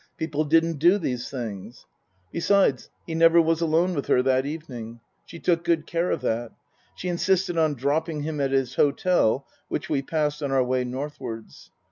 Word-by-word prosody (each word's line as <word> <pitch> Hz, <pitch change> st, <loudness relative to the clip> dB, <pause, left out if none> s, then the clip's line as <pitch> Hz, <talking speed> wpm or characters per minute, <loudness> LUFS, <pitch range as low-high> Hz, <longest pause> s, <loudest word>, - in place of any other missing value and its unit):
People 155 Hz, -1 st, -1 dB
didn't 165 Hz, 0 st, +2 dB
do 175 Hz, +6 st, +5 dB
these 125 Hz, -9 st, -3 dB
things. 110 Hz, -8 st, -7 dB, 0.5 s
Besides, 170 Hz, -7 st, +2 dB, 0.2 s
he 165 Hz, -, -5 dB
never 165 Hz, +1 st, +5 dB
was 165 Hz, 0 st, +2 dB
alone 165 Hz, +3 st, +2 dB
with 140 Hz, -4 st, -3 dB
her 125 Hz, -, +3 dB
that 130 Hz, +1 st, +2 dB
evening. 125 Hz, -7 st, -7 dB, 0.3 s
She -, -, -10 dB
took 170 Hz, 0 st, +1 dB
good 170 Hz, -3 st, +1 dB
care 170 Hz, +1 st, -1 dB
of -, -, -1 dB
that. 115 Hz, +1 st, -2 dB, 0.4 s
She 180 Hz, -, -6 dB
insisted 180 Hz, +1 st, +1 dB
on 155 Hz, -3 st, +2 dB
dropping 150 Hz, +4 st, -1 dB
him 150 Hz, -1 st, -3 dB
at 135 Hz, -, +1 dB
his 135 Hz, -2 st, 0 dB
hotel, 140 Hz, -4 st, +2 dB, 0.2 s
which -, -, -4 dB
we 140 Hz, -3 st, +1 dB
passed 150 Hz, +1 st, -1 dB
on 140 Hz, -2 st, -2 dB
our 135 Hz, -1 st, +3 dB
way 125 Hz, 0 st, 0 dB
northwards. 125 Hz, -4 st, -7 dB
150 Hz, 175 wpm, -25 LUFS, 130-165 Hz, 0.5 s, do